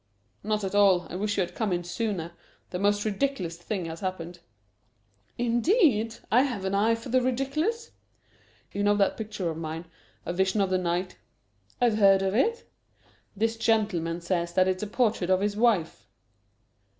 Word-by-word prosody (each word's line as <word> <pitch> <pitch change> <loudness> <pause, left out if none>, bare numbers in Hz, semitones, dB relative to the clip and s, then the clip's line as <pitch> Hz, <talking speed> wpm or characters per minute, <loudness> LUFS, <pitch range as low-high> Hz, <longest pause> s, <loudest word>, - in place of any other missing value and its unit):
"Not 215 0 -1
at 195 - -3
all! 195 -4 +4
I - - -5
wish 205 +2 -1
you - - +3
had 175 -1 -3
come 215 -1 -2
in 175 0 -1
sooner. 175 -2 -3 0.4
The 180 - -3
most 205 +1 +1
ridiculous 210 -6 -1
thing 180 +1 -4
has 165 0 -6
happened." 175 -2 -5 1.0
"Indeed! 240 - +2 0.2
I 245 +4 +6
have 245 -8 -2
an 190 - -1
eye 215 +3 +3
for 230 +3 -9
the 255 +1 +3
ridiculous." 275 - -1 0.8
"You 200 - -3
know 205 0 +3
that 200 -1 +2
picture 210 -6 -4
of 160 - -7
mine, 160 +1 -5 0.4
'A - - -2
Vision 190 +3 +1
of 195 -2 +1
the 185 - +2
Night'?" 180 +1 -2 0.6
"I've 230 -3 +2
heard 195 -1 +5
of 190 0 0
it." 455 - +1 0.7
"This 225 +2 0
gentleman 185 -7 0
says 170 0 -1
that 185 +1 +3
it's 185 0 -1
a 210 - -3
portrait 215 -5 0
of 185 0 +3
his 205 0 0
wife." 195 - +1
200 Hz, 175 wpm, -27 LUFS, 180-225 Hz, 1.0 s, I